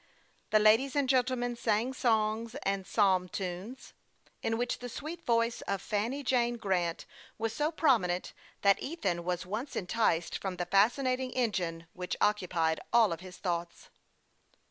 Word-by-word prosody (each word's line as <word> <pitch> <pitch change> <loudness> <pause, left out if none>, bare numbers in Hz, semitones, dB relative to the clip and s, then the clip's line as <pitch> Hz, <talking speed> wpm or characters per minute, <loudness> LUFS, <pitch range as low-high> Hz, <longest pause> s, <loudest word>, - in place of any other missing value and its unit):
The 215 - +5
ladies 225 +6 +4
and 285 -2 +2
gentlemen 250 -2 +1
sang 230 +2 0
songs 225 -1 0
and 195 -1 -1
psalm 190 -4 +2
tunes, 190 +8 -6 0.5
in 225 0 0
which 245 +1 -1
the 245 - -6
sweet 320 +7 -7
voice 230 0 +2
of 200 -1 0
Fanny 230 +9 -2
Jane 240 -2 +1
Grant 180 -6 -1 0.3
was 225 0 -2
so 300 +5 0
prominent 225 - +1 0.3
that 200 -1 +4
Ethan 195 - -2
was 180 0 -2
once 215 +9 -4
en 185 - -2
ticed 175 -5 +1
from 190 -2 -3
the 175 0 -3
fascinating 255 +7 +2
engine 180 -9 -1
which 180 0 -4
occupied 175 -6 +1
all 225 -7 +4
his 180 +2 -11
thoughts. 170 -2 -4
215 Hz, 145 wpm, -31 LUFS, 180-245 Hz, 0.5 s, The